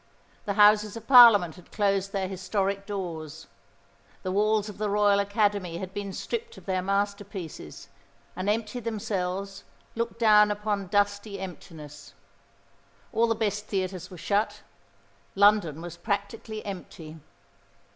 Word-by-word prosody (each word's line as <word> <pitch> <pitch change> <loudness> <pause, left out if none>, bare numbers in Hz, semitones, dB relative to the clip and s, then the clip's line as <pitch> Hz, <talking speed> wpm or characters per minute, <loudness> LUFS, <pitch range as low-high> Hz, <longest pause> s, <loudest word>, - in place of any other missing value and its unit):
The 200 - -1
Houses 210 +1 +5
of 225 - -10
Parliament 225 -9 +7
had 180 - -17
closed 195 -2 0
their 195 -1 -2
historic 195 +1 -2
doors. 170 -7 -6 0.8
The 185 - -2
walls 210 +1 +1
of 205 -1 -9
the 210 -1 -1
Royal 205 0 +3
Academy 200 -4 0
had 190 +1 -7
been 200 -1 -4
stripped 465 - -5
of - - -14
their 185 -1 -1
masterpieces, 195 - -4 0.5
and 185 +2 -2
empty 220 +2 -1
themselves, 200 -4 -4 0.3
looked 230 0 -3
down 210 -2 +6
upon 205 -1 -2
dusty 205 +1 0
emptiness. 155 -5 -10 1.0
All 230 +1 +3
the 225 - +1
best 210 -1 -2
theatres 185 -2 -3
were 180 - -11
shut; 205 +5 -1 0.7
London 200 -6 +3
was 170 -1 -8
practically 210 +3 -4
empty. 165 -5 -8
200 Hz, 130 wpm, -27 LUFS, 185-210 Hz, 1.0 s, Parliament